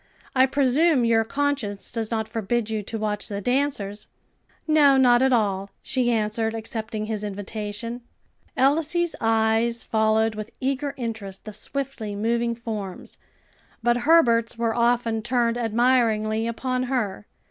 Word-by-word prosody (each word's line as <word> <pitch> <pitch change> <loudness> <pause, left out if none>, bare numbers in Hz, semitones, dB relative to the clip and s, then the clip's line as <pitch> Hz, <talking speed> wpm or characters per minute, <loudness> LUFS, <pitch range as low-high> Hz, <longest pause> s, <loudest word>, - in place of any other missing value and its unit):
I 260 0 +5
presume 275 +1 +3
your 225 -1 +3
conscience 270 -5 -2
does 225 -2 -3
not 220 -2 -2
forbid 225 +1 -2
you 215 -1 -1
to 225 +3 -5
watch 210 -1 -3
the 200 -2 -4
dancers?" 215 -4 -1 0.6
"No, 295 -3 +5
not 245 -2 +5
at 265 0 +3
all," 200 -4 +1
she 255 -2 0
answered, 220 0 0
accepting 220 -1 -4
his 215 -1 -3
invitation. 210 +3 -5 0.6
Elsie's 320 +5 +2
eyes 225 +1 +2
followed 220 0 +2
with 215 0 -7
eager 275 +2 -2
interest 220 -6 -5
the 215 - -7
swiftly 230 -2 -4
moving 235 +2 0
forms, 215 -5 -6 0.6
but 240 +1 +3
Herbert's 240 -5 +3
were 230 -1 0
often 235 -1 +1
turned 235 0 +1
admiringly 225 -2 +2
upon 255 +2 -2
her. 210 -6 -2
230 Hz, 135 wpm, -24 LUFS, 215-255 Hz, 0.6 s, I